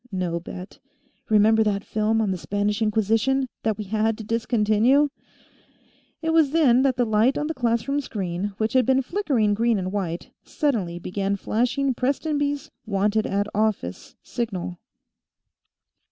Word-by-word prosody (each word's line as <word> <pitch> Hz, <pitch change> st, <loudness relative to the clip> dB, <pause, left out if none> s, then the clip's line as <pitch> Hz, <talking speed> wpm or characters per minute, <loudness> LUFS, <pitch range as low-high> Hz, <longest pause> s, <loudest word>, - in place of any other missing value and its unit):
"No 180 Hz, -3 st, -2 dB
bet. 180 Hz, +2 st, -9 dB, 0.5 s
Remember 220 Hz, +1 st, +5 dB
that 200 Hz, -2 st, -1 dB
film 220 Hz, +1 st, 0 dB
on 200 Hz, -, 0 dB
the 185 Hz, -, -2 dB
Spanish 205 Hz, +3 st, -1 dB
Inquisition, 225 Hz, +5 st, +1 dB
that 220 Hz, -2 st, -1 dB
we 215 Hz, -, -4 dB
had 215 Hz, +2 st, 0 dB
to 220 Hz, -, -7 dB
discontinue?" 230 Hz, +5 st, +2 dB, 1.1 s
It 325 Hz, 0 st, +1 dB
was 320 Hz, -3 st, +4 dB
then 270 Hz, -5 st, +4 dB
that 265 Hz, -2 st, +2 dB
the 245 Hz, -, +2 dB
light 220 Hz, +4 st, +2 dB
on 295 Hz, -, -1 dB
the 320 Hz, -, -2 dB
classroom 245 Hz, +2 st, 0 dB
screen, 195 Hz, -4 st, -4 dB
which 220 Hz, +3 st, -1 dB
had 255 Hz, -1 st, +4 dB
been 265 Hz, +1 st, +2 dB
flickering 255 Hz, -, +1 dB
green 230 Hz, +1 st, +2 dB
and 185 Hz, -1 st, -3 dB
white, 180 Hz, -4 st, -4 dB
suddenly 215 Hz, -, -1 dB
began 195 Hz, +3 st, -2 dB
flashing 250 Hz, +7 st, 0 dB
Prestonby's 285 Hz, +2 st, -1 dB, 0.2 s
wanted 210 Hz, +1 st, +1 dB
at 200 Hz, +1 st, 0 dB
office 210 Hz, -, -2 dB
signal. 185 Hz, -7 st, -4 dB
220 Hz, 145 wpm, -24 LUFS, 205-260 Hz, 1.1 s, Remember